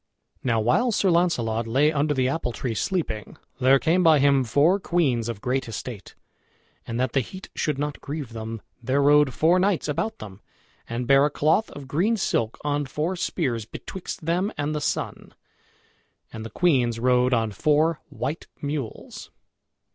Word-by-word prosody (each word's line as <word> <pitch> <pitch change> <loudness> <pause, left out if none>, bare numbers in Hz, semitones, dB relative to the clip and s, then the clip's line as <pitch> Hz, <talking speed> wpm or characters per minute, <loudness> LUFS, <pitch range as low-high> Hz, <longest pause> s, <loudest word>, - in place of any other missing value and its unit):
Now 115 -3 +1
while 180 - +2
Sir 195 -3 +2
Launcelot 120 -10 +1
lay 140 +6 +3
under 145 0 0
the 130 -1 +2
apple 135 -2 -1
tree 120 0 -3
sleeping, 110 - -3 0.2
there 130 +1 +5
came 165 +6 +2
by 160 -3 +6
him 140 -1 +4
four 145 - +3
queens 135 - 0
of 110 -3 -5
great 130 +2 -1
estate. 115 -2 -7 0.7
And 115 0 -3
that 130 - 0
the 135 - +3
heat 185 - -7
should 150 -3 -1
not 145 +1 -3
grieve 145 -5 -6
them, 115 -1 -6 0.2
there 130 +4 0
rode 145 0 +5
four 165 +8 +3
knights 190 -3 +1
about 155 +9 -2
them, 100 -1 -10 0.5
and 120 +1 -3
bare 135 +2 +5
a - - -3
cloth 155 +9 +1
of 140 -2 -10
green 185 - +1
silk 115 - -1
on 145 -1 -1
four 155 +7 -2
spears, 130 - -2
betwixt 185 - -8
them 180 +5 0
and 145 +1 -1
the 150 - -2
sun. - - -3 1.0
And 110 - -6
the 115 - -6
queens 120 - +2
rode 125 +1 +3
on 115 -3 +1
four 155 - +2
white 140 +6 -4
mules. 140 -5 -5
140 Hz, 170 wpm, -24 LUFS, 120-160 Hz, 1.0 s, by